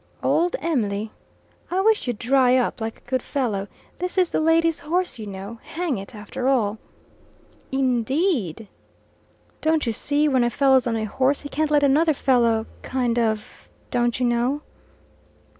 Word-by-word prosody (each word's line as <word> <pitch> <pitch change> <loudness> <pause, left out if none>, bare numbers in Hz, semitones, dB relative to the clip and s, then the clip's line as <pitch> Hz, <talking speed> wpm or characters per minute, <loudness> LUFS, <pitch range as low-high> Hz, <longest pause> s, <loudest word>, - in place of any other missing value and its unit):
"Old 345 +1 +2
Em'ly 215 -9 -1 0.3
'" - - -37 0.2
"I 365 - 0
wish 435 -6 +2
you'd 240 -3 -1
dry 255 +2 +3
up, 245 -2 -1
like 225 0 -4
a - - -27
good 255 0 0
fellow. 220 -9 -2 0.3
This 360 +2 -3
is 365 -2 +3
the - - +1
lady's 325 0 +3
horse, 350 -3 -2
you 215 - -6
know, 200 +3 -7
hang 325 - -3
it, 195 +3 -9
after 230 +5 -4
all." 220 -6 +1 0.9
"In 260 -3 +1
deed!" 245 - -1 0.9
"Don't 315 -1 +2
you 230 - 0
see 290 +6 +1
when 260 -4 +3
a 240 - +2
fellow's 265 0 +3
on 230 - 0
a 220 - -2
horse, 265 +6 +1
he 285 - -7
can't 310 +1 0
let 295 -1 +3
another 300 +3 +4
fellow 235 -5 +2 0.2
kind 245 -2 -1
of 220 -2 -3 0.2
don't 240 0 +1
you 250 - +1
know?" 245 +5 0
255 Hz, 170 wpm, -23 LUFS, 230-300 Hz, 0.9 s, another